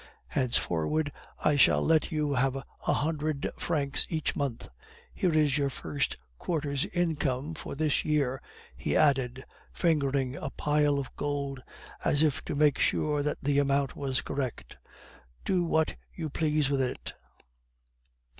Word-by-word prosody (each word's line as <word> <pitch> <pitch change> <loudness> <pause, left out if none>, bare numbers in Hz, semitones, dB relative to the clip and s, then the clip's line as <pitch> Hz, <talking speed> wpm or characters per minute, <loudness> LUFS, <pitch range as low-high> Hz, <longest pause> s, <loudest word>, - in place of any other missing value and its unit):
Henceforward 130 - +1 0.3
I 150 - +2
shall 140 - +5
let 160 -1 +3
you 150 -2 0
have 135 0 +1
a 135 - -5 0.3
hundred 155 -1 -1
francs 145 -4 0
each 160 -2 0
month. 140 -5 -3 0.5
Here 180 - +1
is 150 -2 +3
your 140 -1 +1
first 140 +1 -2 0.2
quarter's 145 -5 -1
income 155 -4 -1
for 155 - -6
this 155 0 +2
year,' 140 -4 0 0.3
he - - 0
added, 130 -4 +2 0.3
fingering 140 -5 +1
a 140 - -4
pile 145 0 +1
of 140 -2 -5
gold, 140 -2 -3 0.4
as 145 +1 +3
if 150 -3 +1
to - - -3
make 145 -1 +3
sure 150 -1 +2
that 150 +1 -1
the 140 0 +2
amount 140 -1 +1
was 135 -2 -1
correct. 130 -4 -4 0.7
'Do 185 -2 +2
what 160 -1 +1 0.2
you 160 -4 -4
please 155 -2 +1
with 135 -1 +2
it. 130 - -3
145 Hz, 140 wpm, -29 LUFS, 135-155 Hz, 0.7 s, shall